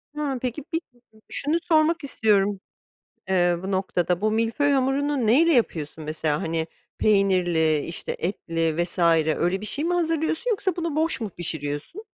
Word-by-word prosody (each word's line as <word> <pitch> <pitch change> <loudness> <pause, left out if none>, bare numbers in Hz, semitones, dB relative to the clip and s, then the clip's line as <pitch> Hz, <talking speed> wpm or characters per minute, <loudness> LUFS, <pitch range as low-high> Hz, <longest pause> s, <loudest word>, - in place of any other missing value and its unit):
Ha, 290 -3 -2
peki 255 +3 -3
bir 325 - 0
ı 240 - -27 0.2
ı - - -20
şunu 300 +4 0
sormak 320 0 +3
istiyorum, 205 -6 +1 0.7
eee, 175 -2 +3
bu 190 - -4
noktada. 180 -2 0
Bu 215 - +1
milföy 230 +6 +1
hamurunu 270 -1 +1
neyle 320 +10 +5
yapıyorsun 160 - -1
mesela, 155 -1 -1
hani, 160 0 -1 0.3
peynirli, 180 -6 +3
işte, 165 - -5
etli 165 -2 -1
vs. 175 - -5 0.4
öyle 180 +3 0
bir 215 - -5
şey 290 +7 -2
mi 350 +1 +1
hazırlıyorsun 325 +5 0
yoksa 395 -4 -1
bunu 335 -3 -3
boş 320 -4 +2
mu 220 - -3
pişiriyorsun? 160 - -5
215 Hz, 160 wpm, -24 LUFS, -, 0.7 s, neyle